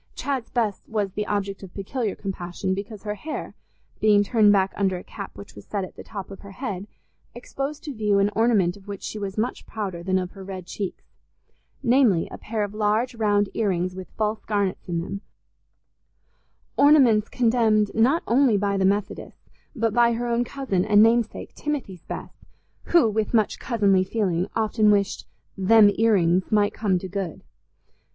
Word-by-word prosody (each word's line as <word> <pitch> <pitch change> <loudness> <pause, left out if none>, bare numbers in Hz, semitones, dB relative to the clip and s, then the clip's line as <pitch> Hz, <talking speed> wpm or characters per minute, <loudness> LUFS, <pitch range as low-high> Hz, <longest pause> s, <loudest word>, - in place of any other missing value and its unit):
Chad's 270 -4 -3
Bess 220 -5 -1
was 210 -3 -1
the 210 +2 -3
object 200 -1 -2
of 190 -3 -11
peculiar 210 +1 -3
compassion, 190 -1 -4
because 200 +1 -6
her 210 -1 -2
hair, 300 +9 -6 0.5
being 210 -1 +5
turned 210 0 +4
back 195 -1 +2
under 190 -2 0
a 180 - -9
cap 200 - -9
which 100 - -11
was 100 - -12
set 200 -2 -2
at 185 - -9
the - - -10
top 200 -2 -8
of 195 - -9
her 200 -1 -12
head, 200 -4 -5 0.5
exposed 275 +4 -5
to 290 - -5
view 210 -3 +1
an 200 +1 +2
ornament 210 -6 +3
of 200 0 -17
which 200 -1 -7
she 215 - -5
was 200 -1 -5
much 225 +4 -2
prouder 195 -6 -4
than 185 +2 0
of 180 -1 -3
her 195 - -11
red 190 -2 -7
cheeks—namely, 210 +2 -2
a - - -8
pair 215 -1 -2
of 205 0 -4
large 215 +4 +1
round 205 -3 +1
ear 220 -3 0
rings 180 0 -1
with 185 0 -8
false 215 0 -1
garnets 200 -3 -1
in 170 -1 -1
them, 195 +3 -6 1.6
ornaments 265 -8 +5
condemned 225 -4 +2
not 255 +9 +3
only 245 -2 +3
by 200 0 0
the 190 - +2
Methodists, 200 +1 -2 0.2
but 225 -3 0
by 235 0 +4
her 235 +1 -2
own 235 0 +1
cousin 245 -8 -1
and 210 +1 +5
namesake 230 +1 +1
Timothy's 255 - -4
Bess, - - -8 0.4
who, 340 -8 +4
with 220 +2 -1
much 215 -2 +1
cousinly 200 -6 +2
feeling, 185 -3 -1
often 215 -1 +2
wished 200 -1 +1 0.3
"them 205 +2 +6
ear 225 0 +3
rings" 180 -1 +2
might 210 -1 +3
come 200 -4 +1
to 190 - -5
good. 185 -3 -5
205 Hz, 180 wpm, -24 LUFS, 195-225 Hz, 1.6 s, them